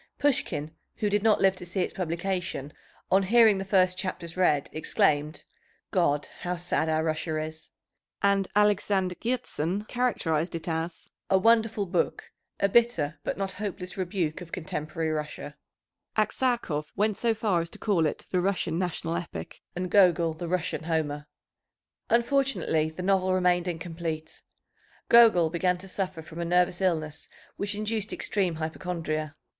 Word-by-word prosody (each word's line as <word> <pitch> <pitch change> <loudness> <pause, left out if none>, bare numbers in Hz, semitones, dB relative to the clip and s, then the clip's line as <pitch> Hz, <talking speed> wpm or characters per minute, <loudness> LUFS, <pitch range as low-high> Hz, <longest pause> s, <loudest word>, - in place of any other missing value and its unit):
Pushkin, 215 - 0 0.2
who 210 -1 -1
did 205 0 +2
not 220 0 +4
live 195 0 +4
to - - -6
see 180 +2 -2
its - - -2
publication, 175 -4 -3 0.4
on 190 - +5
hearing 220 0 +5
the - - -2
first 185 -1 +2
chapters 180 -3 -4
read, 155 -6 +2
exclaimed, 150 0 +1 0.5
"God, 150 -6 +2
how 180 0 -2
sad 170 -2 0
our 160 0 +1
Russia 155 0 -1
is!" 155 +1 -5 0.5
And 200 -1 +2
Alexander 205 -2 +2
Hertzen 210 -6 -1
characterized 180 -10 0
it 165 - -6
as 165 +1 -4 0.2
"a 190 - +5
wonderful 225 0 +3
book, 175 - -1 0.3
a 200 - +3
bitter, 215 -9 +2
but - - -2
not 195 -1 -2
hopeless 190 -2 -5
rebuke 180 -4 -2
of 170 -2 -10
contemporary 160 -1 -3
Russia." 150 -1 -5 0.6
Aksakov 215 - 0
went 210 +1 +1
so 230 +1 +1
far 205 -6 +1
as 165 - -5
to - - -9
call 180 -7 +2
it - - -5
the 180 - +2
Russian 175 -3 0
national 170 -2 -2
epic, 170 0 -6
and 180 0 -3
Gogol 175 -4 +5
the 170 +2 -6
Russian 180 -2 -2
Homer. 150 -3 -1 0.8
Unfortunately 235 - +2
the 160 +3 -7
novel 185 -1 +2
remained 180 -1 +2
incomplete. 165 -2 -4 0.7
Gogol 215 -9 +7
began 180 +1 +1
to 190 +2 -10
suffer 185 -3 -3
from 165 +1 -10
a - - -1
nervous 180 +1 +2
illness 155 -5 -1 0.3
which 205 0 -2
induced 215 0 -2
extreme 185 -5 0
hypochondria. 155 -1 -3
180 Hz, 150 wpm, -27 LUFS, 160-200 Hz, 0.8 s, Gogol